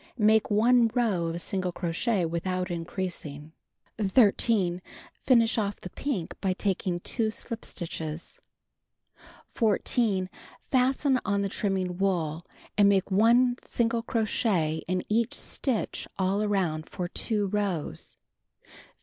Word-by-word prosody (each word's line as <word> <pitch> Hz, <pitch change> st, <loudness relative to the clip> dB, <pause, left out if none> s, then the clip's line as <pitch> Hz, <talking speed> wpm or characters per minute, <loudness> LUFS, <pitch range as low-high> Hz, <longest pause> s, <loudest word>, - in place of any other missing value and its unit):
Make 220 Hz, -1 st, +4 dB
1 230 Hz, +3 st, +4 dB
row 205 Hz, -9 st, +1 dB
of 165 Hz, +1 st, -3 dB
single 185 Hz, 0 st, -2 dB
crochet 175 Hz, +3 st, -1 dB
without 180 Hz, +2 st, -2 dB
increasing. 165 Hz, -4 st, -5 dB, 0.5 s
13. 200 Hz, -3 st, +3 dB, 0.5 s
Finish 230 Hz, -3 st, +4 dB
off 205 Hz, -2 st, -1 dB
the 185 Hz, -, -9 dB
pink 230 Hz, -, -3 dB
by 190 Hz, -2 st, +1 dB
taking 185 Hz, -2 st, -1 dB
2 225 Hz, +2 st, 0 dB
slip 230 Hz, +1 st, -4 dB
stitches. 160 Hz, -1 st, -5 dB, 1.1 s
14. 215 Hz, -3 st, +1 dB, 0.4 s
Fasten 260 Hz, +1 st, +2 dB
on 200 Hz, -1 st, 0 dB
the 200 Hz, -, -1 dB
trimnung 185 Hz, -3 st, -2 dB
wool, 170 Hz, -5 st, 0 dB, 0.3 s
and 200 Hz, -1 st, +5 dB
make 195 Hz, 0 st, +1 dB
1 240 Hz, +5 st, +4 dB
single 235 Hz, 0 st, 0 dB
crochet 210 Hz, -9 st, 0 dB
in 185 Hz, +1 st, -1 dB
each 225 Hz, +1 st, +1 dB
stitch 255 Hz, -6 st, -1 dB
all 195 Hz, +2 st, +1 dB
around 180 Hz, -7 st, -1 dB
for 180 Hz, -, -4 dB
2 210 Hz, +3 st, -1 dB
rows. 185 Hz, -, -3 dB, 0.5 s
15. -, -, -20 dB
195 Hz, 120 wpm, -27 LUFS, 175-225 Hz, 1.1 s, and